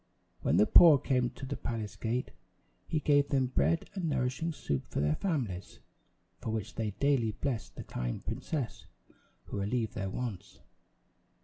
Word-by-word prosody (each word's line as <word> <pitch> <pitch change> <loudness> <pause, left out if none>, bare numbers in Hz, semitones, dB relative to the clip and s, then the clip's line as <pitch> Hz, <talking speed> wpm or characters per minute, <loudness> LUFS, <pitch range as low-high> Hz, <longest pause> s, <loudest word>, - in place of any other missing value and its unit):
When - - +2
the 105 - +6
poor 160 +2 +9
came 125 -2 +1
to 135 - -6
the 140 +1 -3
palace 110 -3 -4
gate, 120 +3 -2 0.6
he 155 - 0
gave 145 -1 +3
them 135 -2 +2
bread 85 - +1
and 180 -5 -2
nourishing 130 +4 0
soup 70 - -3
for - - -3
their 75 +1 +2
families, 115 - -2 0.6
for - - -5
which 110 -1 -3
they 110 -2 -2
daily 135 -6 +2
blessed 130 -3 -3
the - - -6
kind - - -4
princess 145 -7 -3 0.6
who 100 - -5
relieved 110 +3 -1
their 95 0 -3
wants. 110 -3 -5
125 Hz, 155 wpm, -31 LUFS, 105-140 Hz, 0.6 s, poor